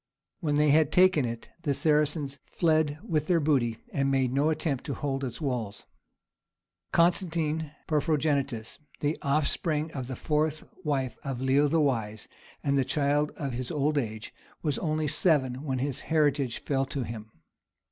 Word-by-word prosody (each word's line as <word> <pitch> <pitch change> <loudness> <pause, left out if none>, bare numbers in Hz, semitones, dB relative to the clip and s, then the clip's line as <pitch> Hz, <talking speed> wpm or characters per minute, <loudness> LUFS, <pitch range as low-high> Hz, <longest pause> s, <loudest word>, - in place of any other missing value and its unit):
When 150 -5 0
they 150 0 +4
had 155 0 +4
taken 180 -6 +5
it 115 -1 -5
the 145 -4 0
Saracens 150 -2 +1
fled 155 -3 +1
with 155 -9 -1
their 175 -2 +3
booty, 130 -7 +1 0.2
and 135 -1 +1
made 130 -2 +1
no 145 +3 +3
attempt 155 -4 -1
to 140 - -3
hold 135 -2 -2
its 125 -3 -4
walls. 125 -9 -3 1.1
Constantine 165 -3 +1 0.2
Porphyrogenitus, 145 -6 0 0.2
the 150 +2 +1
offspring 150 +2 0
of 130 -5 -5
the 130 - -4
fourth 155 +1 0 0.2
wife 135 -6 -1
of 135 -3 -3
Leo 135 +3 +3
the 165 +3 +2
Wise, 110 -8 -1 0.4
and 140 -1 +2
the - - +3
child 145 +2 +1
of 140 -4 -3
his 125 +1 -4
old 150 0 0
age, 110 -5 -3 0.3
was 150 -4 0
only 155 -2 0
seven 145 -4 +2
when 130 -3 -1
his 135 +1 -2
heritage 145 -6 +1
fell 135 -1 0
to 135 -1 -3
him. 110 -1 -7
145 Hz, 155 wpm, -28 LUFS, 130-155 Hz, 1.1 s, taken